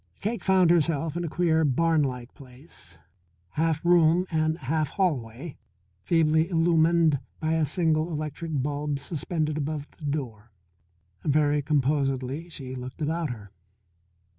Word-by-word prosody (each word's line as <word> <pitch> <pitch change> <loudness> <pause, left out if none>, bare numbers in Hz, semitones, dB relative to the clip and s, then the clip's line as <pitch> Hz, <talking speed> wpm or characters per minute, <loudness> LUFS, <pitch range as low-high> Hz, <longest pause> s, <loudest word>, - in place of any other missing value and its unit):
Cake 225 +3 -3
found 185 -3 +4
herself 165 -2 +1
in 175 - -2
a 170 - -3
queer, 160 -1 +2
barnlike 140 -4 +1
place, 125 - -14 0.5
half 160 - -1
room 175 0 +4
and 155 0 +1
half 150 +1 -1
hallway, 140 - -2 0.4
feebly 160 - +2
illumined 165 -3 +3 0.2
by 160 0 0
a 160 -1 +2
single 160 0 +1
electric 155 -1 -3
bulb 145 0 -2
suspended 155 +1 -2
above 150 0 -3
the 155 - -8
door. 120 -7 -4 0.7
Very 150 0 +2
composedly 140 +1 0
she 130 -5 -7
looked 125 0 -7
about 160 +1 -1
her. 105 -5 -8
155 Hz, 125 wpm, -26 LUFS, 140-165 Hz, 0.7 s, found